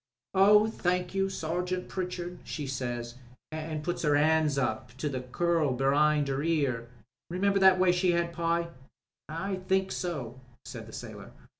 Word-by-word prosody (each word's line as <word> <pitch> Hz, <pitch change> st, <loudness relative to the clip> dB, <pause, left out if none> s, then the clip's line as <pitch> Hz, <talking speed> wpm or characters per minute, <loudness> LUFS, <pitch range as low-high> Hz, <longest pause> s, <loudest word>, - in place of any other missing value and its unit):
'Oh, 210 Hz, +2 st, +6 dB
thank 180 Hz, -4 st, -1 dB
you, 195 Hz, 0 st, +1 dB
Sergeant 180 Hz, +1 st, -2 dB
Pritchard,' 180 Hz, -1 st, -4 dB
she 150 Hz, -, -5 dB
says, 120 Hz, -2 st, -4 dB, 0.3 s
an' 155 Hz, -1 st, -4 dB
put 175 Hz, +2 st, -2 dB
'er 150 Hz, -2 st, +3 dB
hand 155 Hz, -1 st, +3 dB
up 115 Hz, -5 st, -2 dB
to 150 Hz, -, -2 dB
the 130 Hz, -2 st, -3 dB
curl 155 Hz, +2 st, +1 dB
be'ind 145 Hz, +3 st, +3 dB
'er 135 Hz, 0 st, -1 dB
ear. 140 Hz, -7 st, 0 dB, 0.4 s
Remember 195 Hz, +3 st, +1 dB
that 190 Hz, -1 st, +7 dB
way 185 Hz, -1 st, +4 dB
she 180 Hz, 0 st, +2 dB
had, 170 Hz, 0 st, 0 dB
Pye?" 170 Hz, 0 st, 0 dB, 0.6 s
"I 190 Hz, +5 st, -3 dB
think 190 Hz, 0 st, +2 dB
so," 135 Hz, -9 st, -4 dB, 0.3 s
said -, -, -8 dB
the -, -, -11 dB
sailor. -, -, -8 dB
165 Hz, 155 wpm, -29 LUFS, 145-180 Hz, 0.6 s, that